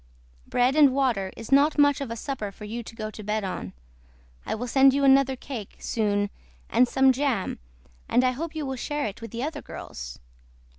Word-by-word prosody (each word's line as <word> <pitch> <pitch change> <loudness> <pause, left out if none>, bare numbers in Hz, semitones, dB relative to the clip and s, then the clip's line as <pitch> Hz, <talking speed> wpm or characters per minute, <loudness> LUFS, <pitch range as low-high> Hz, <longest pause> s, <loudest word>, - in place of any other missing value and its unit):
BREAD 250 +3 +2
AND 285 -4 +6
WATER 235 -9 +1
IS 225 - -9
NOT 285 +3 +5
MUCH 285 -1 +4
OF 275 - -4
A 230 - -4
SUPPER 225 -3 -4
FOR 205 - -13
YOU 225 +3 -5
TO 225 - -11
GO 215 -1 -5
TO 215 - -9
BED 210 +1 -1
ON. 180 - -5 0.7
I - - -1
WILL 235 +3 -4
SEND 270 +2 +5
YOU 280 - +1
ANOTHER 270 -1 +5
CAKE 245 -5 -7
SOON 205 -2 0 0.4
AND 245 +2 +5
SOME 265 +1 +4
JAM 260 -6 -1 0.5
AND 245 - +4
I 255 - +3
HOPE 320 +5 -5
YOU 310 -2 -3
WILL 265 -1 -3
SHARE 295 +3 -2
IT 205 +1 -5
WITH 230 - -7
THE 235 +4 -4
OTHER 295 0 -4
GIRLS. 60 0 -8
250 Hz, 205 wpm, -26 LUFS, 215-275 Hz, 0.7 s, AND